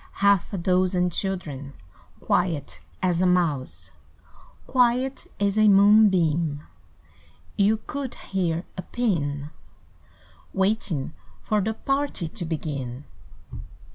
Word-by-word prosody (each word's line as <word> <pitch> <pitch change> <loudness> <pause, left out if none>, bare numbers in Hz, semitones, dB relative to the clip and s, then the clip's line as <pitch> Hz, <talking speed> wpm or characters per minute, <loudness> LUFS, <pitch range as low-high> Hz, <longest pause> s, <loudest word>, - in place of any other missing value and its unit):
Half 200 -2 +2
a 200 - -3
dozen 180 0 +1
children 155 -8 -3 0.5
Quiet 165 -6 -1 0.2
as 180 -2 +1
a 185 - +4
mouse, 165 -7 0 0.7
Quiet 255 +1 +1
as 200 +1 +1
a 215 - +6
moonbeam, 185 -7 +4 0.9
You 205 +2 +3
could 280 -4 -5
hear 175 -3 -2
a 185 - -4
pin 150 -10 -2 1.0
Waiting 190 -7 0 0.3
for 215 -1 +1
the 220 +3 -2
party 275 - -1
To 175 +2 -6
begin. 140 -5 -4
185 Hz, 100 wpm, -25 LUFS, 160-210 Hz, 1.0 s, a